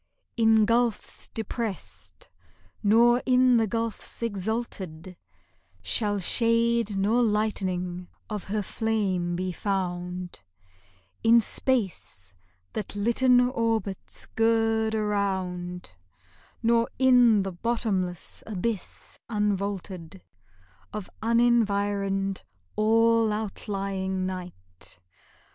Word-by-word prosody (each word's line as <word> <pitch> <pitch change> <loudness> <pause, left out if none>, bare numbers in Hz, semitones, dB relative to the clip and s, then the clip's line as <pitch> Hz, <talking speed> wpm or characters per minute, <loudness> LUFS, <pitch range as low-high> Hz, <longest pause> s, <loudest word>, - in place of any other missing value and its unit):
In 225 -2 +5
gulfs 235 0 0
depressed 225 -2 -6 0.5
nor 235 +4 +5
in 255 -1 +4
the 225 -1 +2
gulfs 230 +1 -4
exalted 195 -5 -4 0.7
Shall 205 - +2
shade 230 +1 +2
nor 215 +5 +2
lightening 185 -5 -1 0.2
of 210 -3 -5
her 210 +1 -2
flame 195 -5 -1
be 185 +1 -2
found; 180 - -3 0.8
In 230 +1 +6
space 190 - -2 0.4
that 210 -1 -5
litten 240 +4 +4
orbits 230 -5 -2
gird 225 -1 +2
around, 190 - -2 0.7
Nor 230 0 +3
in 245 -5 +5
the 195 - -3
bottomless 190 -3 -2
abyss 215 -1 -4
unvaulted 200 -4 -2 0.7
Of 210 -3 -6
unenvironed, 205 -4 +1 0.3
all 225 +1 +3
outlying 195 -3 -3
night. 175 - -7
210 Hz, 80 wpm, -27 LUFS, 190-230 Hz, 0.8 s, In